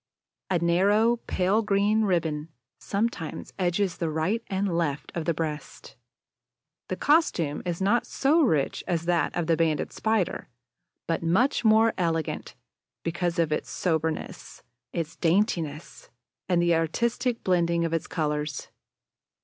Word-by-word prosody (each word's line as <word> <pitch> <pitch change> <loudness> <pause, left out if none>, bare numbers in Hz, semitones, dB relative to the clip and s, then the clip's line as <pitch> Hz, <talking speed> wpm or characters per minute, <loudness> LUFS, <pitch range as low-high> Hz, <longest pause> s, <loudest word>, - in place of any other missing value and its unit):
A 185 - +2
narrow, 200 +7 +3
pale 190 +4 +2
green 210 +1 +2
ribbon 160 -5 -1 0.3
sometimes 200 -6 -3
edges 180 +1 0
the 165 - -1
right 160 +9 0
and 195 -2 -1
left 150 -4 -2
of 165 -2 -3
the 170 - +1
breast. 155 -1 -5 0.9
The - - -2
costume 185 - +2
is 175 +2 -2
not 230 +5 +2
so 300 +5 +2
rich 155 - +1
as 170 -2 -1
that 175 -1 +1
of 175 - 0
the 165 0 +3
Banded 160 -2 0
Spider, 220 -4 -1 0.6
but 165 - -1
much 205 - +2
more 220 0 +5
elegant 165 -3 -2 0.5
because 170 +1 -1
of 165 -2 +1
its 150 - -2
soberness, 160 -2 -3 0.3
its 165 -1 -4
daintiness, 165 -4 -1 0.4
and 175 -2 +3
the 175 0 +3
artistic 235 +9 0
blending 170 -2 +2
of 165 - -2
its 165 0 -1
colors. 150 -3 -2
170 Hz, 135 wpm, -26 LUFS, 160-205 Hz, 0.9 s, more